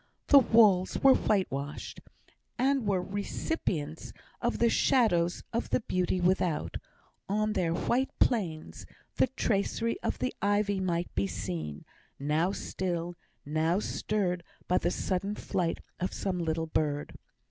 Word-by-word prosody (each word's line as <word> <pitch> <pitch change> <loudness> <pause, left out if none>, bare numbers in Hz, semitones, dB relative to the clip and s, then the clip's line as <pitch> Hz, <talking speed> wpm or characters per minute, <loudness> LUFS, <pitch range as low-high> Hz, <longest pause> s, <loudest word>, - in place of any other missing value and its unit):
The 285 - +10
walls 210 -7 +4
were 270 -1 +9
whitewashed, 150 - -1 0.6
and 265 -2 +2
were 190 -3 +1
recipients 185 - -3 0.3
of 240 0 0
the 235 - +4
shadows 195 -9 +2
of 230 - -1
the - - +1
beauty 185 -3 0
without; 180 -3 +1 0.5
on 215 +1 +1
their 175 -4 +1
"white 245 +10 +1
plains" 175 -10 -1 0.3
the - - +4
tracery 230 -1 -1
of - - -1
the 255 - -2
ivy 205 0 +1
might 175 -2 -1
be 100 +1 0
seen, 85 -7 -5 0.3
now 155 +6 +1
still, 175 -3 -3 0.3
now 160 +4 +1
stirred 185 -5 -1 0.2
by 180 - +3
the 175 - 0
sudden 195 +3 -2
flight 175 -5 -2 0.2
of 185 +1 -2
some 185 -2 -2
little 165 -1 -1
bird. 150 -2 -1
185 Hz, 130 wpm, -30 LUFS, 165-215 Hz, 0.6 s, The